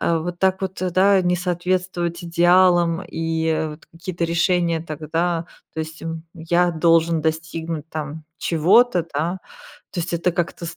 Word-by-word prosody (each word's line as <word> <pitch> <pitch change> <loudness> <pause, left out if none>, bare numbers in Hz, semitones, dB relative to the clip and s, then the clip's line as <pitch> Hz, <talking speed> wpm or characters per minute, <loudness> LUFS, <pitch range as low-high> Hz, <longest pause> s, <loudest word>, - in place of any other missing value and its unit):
вот 170 +1 -1
так 190 0 +2
вот, 190 0 -4
да, 195 +2 +5
не 180 0 +2
соответствовать 180 0 -1
идеалам, 175 0 +4
и 160 -2 -1
вот 150 +2 -12
какие-то 170 +1 -5
решения 170 0 +1
тогда, 165 +2 -2 0.3
то 160 - -2
есть, 160 0 -7
м, 165 0 -5
"я 175 +1 +1
должен 165 0 +3
достигнуть, 160 0 -3
там, 155 0 -6
чего-то", 180 +5 +4
да, 165 +6 -1 0.5
то 175 - -3
есть 170 - -4
это 170 +1 0
как-то 170 0 -3
с 165 0 -7
170 Hz, 145 wpm, -22 LUFS, 160-180 Hz, 0.5 s, да